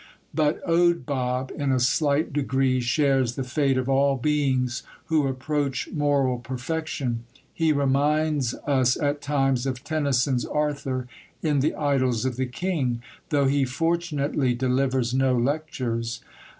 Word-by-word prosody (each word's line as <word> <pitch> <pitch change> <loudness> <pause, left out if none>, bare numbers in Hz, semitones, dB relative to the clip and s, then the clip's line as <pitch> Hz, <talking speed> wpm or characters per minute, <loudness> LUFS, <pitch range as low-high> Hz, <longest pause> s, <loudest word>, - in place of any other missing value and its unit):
But 155 +4 0
Owd 170 -3 +3
Bob 130 -1 -2
in 140 -3 0
a 130 - +2
slight 145 +4 +1
degree 135 -2 +1
shares 130 0 +1
the 135 - -2
fate 135 +1 +1
of 130 -1 -1
all 135 0 +3
beings 130 -3 0 0.2
who 155 -3 +2
approach 135 +1 -2
moral 140 -4 +1
perfection. 130 -1 -3 0.3
He 160 -2 +2
reminds 145 -1 +1
us 130 -3 +2
at 145 -1 -1
times 135 -3 +1
of 130 -1 -3
Tennyson's 140 -4 +1
Arthur 140 -4 -2 0.4
in 150 -3 +2
the 150 +4 +1
Idylls 130 -5 +1
of 130 -2 -1
the 130 +1 -1
King, 130 -5 -2 0.3
though 145 -2 +2
he 140 +1 +2
fortunately 150 -2 0
delivers 130 -1 0
no 130 -1 +2
lectures. 120 -4 -2
135 Hz, 135 wpm, -25 LUFS, 130-150 Hz, 0.4 s, Owd